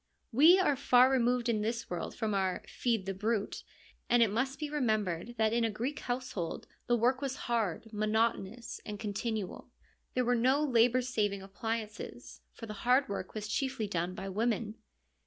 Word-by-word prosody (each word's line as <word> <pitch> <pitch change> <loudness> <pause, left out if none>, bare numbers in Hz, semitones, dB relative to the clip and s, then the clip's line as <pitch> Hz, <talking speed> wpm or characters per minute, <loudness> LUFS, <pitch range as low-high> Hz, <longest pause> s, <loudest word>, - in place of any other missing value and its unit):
We 310 +10 +7
are 365 -7 +3
far 255 -1 +5
removed 245 -1 +2
in 220 -3 +1
this 230 +2 -2
world 175 - -4
from 220 -3 -1
our 190 -2 0
' - - -28
Feed 230 -6 +1
the 195 - -2
brute/ 210 +2 -2 0.5
and 240 -1 +6
it 215 - +1
must 265 +5 -1
be 300 +1 -3
remembered 220 - -1
that 220 0 +2
in 235 0 +2
a 225 - +2
Greek 240 +7 -3
household 245 -9 -4 0.2
the 240 - +4
work 250 +3 +2
was 270 -2 -2
hard, 225 -2 -1
mono 220 +2 +2
tonous, 230 +5 -8
and 210 -1 -6
continual. 210 -1 -4 0.5
There 250 -1 +2
were 245 - +3
no 260 +5 +3
labour 250 -2 +4
saving 205 -5 -1
appliances, 215 +2 -5
for 230 - -9
the 215 - -6
hard 255 +2 +3
work 200 0 -5
was 215 -1 -4
chiefly 255 0 -1
done 180 -1 -2
by 195 - -5
women. 215 +2 -1
230 Hz, 180 wpm, -32 LUFS, 210-250 Hz, 0.5 s, We